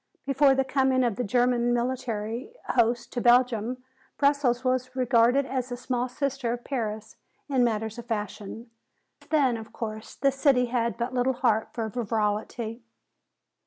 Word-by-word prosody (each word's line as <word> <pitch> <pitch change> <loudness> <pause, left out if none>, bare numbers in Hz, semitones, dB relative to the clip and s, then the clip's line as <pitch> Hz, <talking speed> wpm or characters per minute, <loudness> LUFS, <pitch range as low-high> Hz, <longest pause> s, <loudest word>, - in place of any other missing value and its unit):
Before 275 0 +4
the 270 - +2
coming 265 -1 +2
of 235 -4 +1
the 245 - -2
German 240 +2 +2
military 235 - -3 0.2
hosts 235 0 +2
to 245 - -4
Belgium, 245 0 +3 0.3
Brussels 280 -4 +2
was 255 0 -1
regarded 250 +1 +3
as 260 -1 -3
the 245 - -4
small 250 0 -2
sister 270 -2 -2
of 240 0 -6
Paris 220 -5 -4 0.3
in 265 -4 +2
matters 220 -1 -1
of 235 - -9
fashion. 215 +1 -5 0.5
Since - - -23
then, 275 -7 +3
of 220 -1 -10
course, 220 -1 -6
the 275 +1 +2
city 270 -2 +3
had 235 -1 -1
but 240 +2 -3
little 255 +1 +1
heart 225 -3 +1
for 225 -2 -2
frivolity. 220 +1 -2
245 Hz, 155 wpm, -27 LUFS, 230-260 Hz, 0.5 s, Before